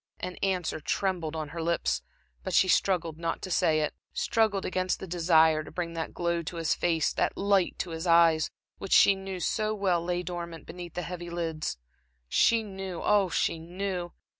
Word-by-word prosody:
An 180 Hz, 0 st, -5 dB
answer 180 Hz, -5 st, -1 dB
trembled 165 Hz, 0 st, -1 dB
on 155 Hz, -2 st, -4 dB
her 165 Hz, +2 st, -5 dB
lips, 170 Hz, +1 st, 0 dB, 0.4 s
but -, -, -2 dB
she 190 Hz, -, +5 dB
struggled 170 Hz, -3 st, +1 dB
not 165 Hz, 0 st, -2 dB
to 185 Hz, -, -5 dB
say 155 Hz, -2 st, +3 dB
it; 150 Hz, -, -1 dB, 0.2 s
struggled 215 Hz, -4 st, +1 dB
against 185 Hz, 0 st, -1 dB
the -, -, -6 dB
desire 160 Hz, -3 st, +4 dB
to -, -, -10 dB
bring 170 Hz, -2 st, -4 dB
that 165 Hz, -1 st, -4 dB
glow 170 Hz, -1 st, -1 dB
to 170 Hz, +2 st, -6 dB
his 165 Hz, -2 st, +1 dB
face, 165 Hz, -3 st, +1 dB
that -, -, 0 dB
light 195 Hz, -2 st, +2 dB
to 175 Hz, -, -4 dB
his 165 Hz, +2 st, -4 dB
eyes, 165 Hz, -2 st, +5 dB, 0.3 s
which 195 Hz, -, -2 dB
she 200 Hz, -, +7 dB
knew 190 Hz, -1 st, -6 dB
so 215 Hz, +4 st, 0 dB
well 185 Hz, -4 st, +1 dB
lay 175 Hz, 0 st, -1 dB
dormant, 170 Hz, -2 st, -6 dB
beneath 175 Hz, 0 st, -9 dB
the 180 Hz, -, -2 dB
heavy 175 Hz, 0 st, -6 dB
lids. 165 Hz, -, -3 dB, 0.5 s
She 230 Hz, -, +3 dB
knew, 190 Hz, -3 st, -6 dB
ah, 205 Hz, -3 st, +3 dB
she 165 Hz, -, 0 dB
knew. 180 Hz, +1 st, -4 dB
175 Hz, 190 wpm, -28 LUFS, 165-190 Hz, 0.5 s, she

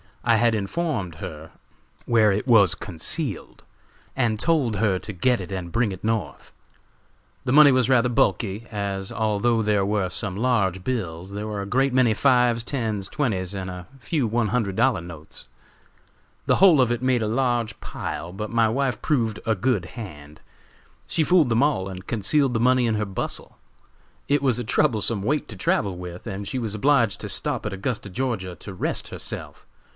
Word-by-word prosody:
I 115 Hz, -1 st, +4 dB
had 115 Hz, 0 st, +3 dB
informed 105 Hz, -, -2 dB
her 80 Hz, 0 st, -8 dB, 0.5 s
where 110 Hz, -3 st, +4 dB
it 105 Hz, +6 st, -2 dB
was 105 Hz, -8 st, +5 dB
concealed, 95 Hz, -, -4 dB, 0.5 s
and 115 Hz, -5 st, 0 dB
told 145 Hz, -7 st, +1 dB
her 100 Hz, -2 st, +1 dB
to 105 Hz, -, -7 dB
get 120 Hz, +5 st, +1 dB
it 90 Hz, -, -8 dB
and 90 Hz, -3 st, -5 dB
bring 115 Hz, 0 st, +1 dB
it 95 Hz, -, -8 dB
North. 105 Hz, -10 st, -3 dB, 0.9 s
"The -, -, -1 dB
money 145 Hz, +1 st, +8 dB
was 130 Hz, -1 st, +2 dB
rather 125 Hz, -1 st, +4 dB
bulky, 115 Hz, -4 st, 0 dB
as 100 Hz, -1 st, -3 dB
although 110 Hz, +1 st, +1 dB
there 105 Hz, -2 st, +1 dB
were 100 Hz, -2 st, 0 dB
some 95 Hz, +1 st, -2 dB
large 100 Hz, -5 st, 0 dB
bills, 95 Hz, -7 st, -3 dB
there 105 Hz, +1 st, -5 dB
were 105 Hz, -2 st, -3 dB
a -, -, -4 dB
great 135 Hz, +4 st, +1 dB
many 125 Hz, -3 st, +4 dB
fives, 125 Hz, -2 st, +3 dB
tens, 110 Hz, -7 st, -2 dB
twenties 105 Hz, -, -1 dB
and 95 Hz, -1 st, -4 dB
a 90 Hz, -1 st, -8 dB
few 135 Hz, -1 st, -1 dB
one 115 Hz, +1 st, 0 dB
hundred 105 Hz, -3 st, -1 dB
dollar 120 Hz, -6 st, +2 dB
notes. 80 Hz, -7 st, -9 dB, 1.0 s
The -, -, +3 dB
whole 175 Hz, -7 st, +6 dB
of 120 Hz, -2 st, +2 dB
it 120 Hz, -, -1 dB
made 130 Hz, -3 st, +2 dB
a -, -, -1 dB
large 120 Hz, -2 st, 0 dB
pile, 85 Hz, -, -6 dB
but 105 Hz, +3 st, -6 dB
my 115 Hz, -1 st, +3 dB
wife 130 Hz, 0 st, -1 dB
proved 115 Hz, -8 st, 0 dB
a 110 Hz, -2 st, +2 dB
good 105 Hz, -3 st, 0 dB
hand. 75 Hz, -, -10 dB, 0.7 s
She 160 Hz, -, +1 dB
fooled 165 Hz, -4 st, +4 dB
them 115 Hz, +3 st, +3 dB
all, 140 Hz, -11 st, +1 dB
and 95 Hz, -1 st, -8 dB
concealed 125 Hz, +5 st, +2 dB
the 115 Hz, -, 0 dB
money 125 Hz, +1 st, +3 dB
in 115 Hz, -2 st, +1 dB
her 105 Hz, 0 st, -1 dB
bustle. 95 Hz, -1 st, -4 dB, 0.7 s
It 140 Hz, 0 st, +2 dB
was 130 Hz, -4 st, +2 dB
a -, -, -2 dB
troublesome 110 Hz, -4 st, +1 dB
weight 145 Hz, +6 st, 0 dB
to 110 Hz, -, -7 dB
travel 95 Hz, 0 st, 0 dB
with, 90 Hz, 0 st, -8 dB
and 100 Hz, -2 st, -5 dB
she 130 Hz, -, -3 dB
was 110 Hz, -3 st, -3 dB
obliged 115 Hz, -4 st, +2 dB
to -, -, -4 dB
stop -, -, -2 dB
at 105 Hz, -, -3 dB
Augusta, 100 Hz, +1 st, -3 dB
Ga., 95 Hz, -4 st, -3 dB
to 100 Hz, -, -9 dB
rest 90 Hz, -, -3 dB
herself. -, -, -6 dB
110 Hz, 180 wpm, -24 LUFS, 95-125 Hz, 1.0 s, money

